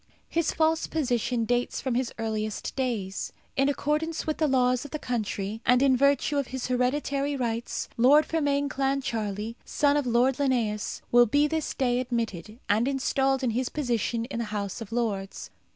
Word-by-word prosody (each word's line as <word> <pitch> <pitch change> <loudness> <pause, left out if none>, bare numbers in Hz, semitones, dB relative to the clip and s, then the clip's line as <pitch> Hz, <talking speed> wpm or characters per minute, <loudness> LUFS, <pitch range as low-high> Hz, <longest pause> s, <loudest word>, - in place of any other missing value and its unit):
His 335 -1 +1
false 320 0 +1
position 245 -5 0
dates 245 +1 0
from 260 -3 -2
his 245 0 0
earliest 215 -2 -3
days. 220 -8 -2 0.2
In 270 +1 +3
accordance 300 +3 -1
with 310 - -2
the 310 - +3
laws 255 -2 +2
of 290 - -8
the 305 - -3
country, 220 -5 -3
and 250 0 +4
in 270 -2 +5
virtue 280 +2 +2
of 275 - -2
his 260 0 -4
hereditary 275 +3 0
rights, 235 -3 -2
Lord 280 +6 +6
Fermain 285 -3 +1
Clancharlie, 230 -6 -2
son 285 -1 +2
of 285 -3 -1
Lord 245 +2 +3
Linnæus, 235 -7 -1
will 240 0 +6
be 290 +6 +3
this 315 0 -2
day 250 -2 +1
admitted, 230 -5 -3
and 220 +4 +2
installed 270 0 +1
in 245 - +1
his 250 +3 -1
position 235 -4 -1
in 245 -2 -5
the 235 - -1
House 205 -1 -4
of 220 -1 -8
Lords. 195 - -3
250 Hz, 170 wpm, -27 LUFS, 230-280 Hz, 0.2 s, Lord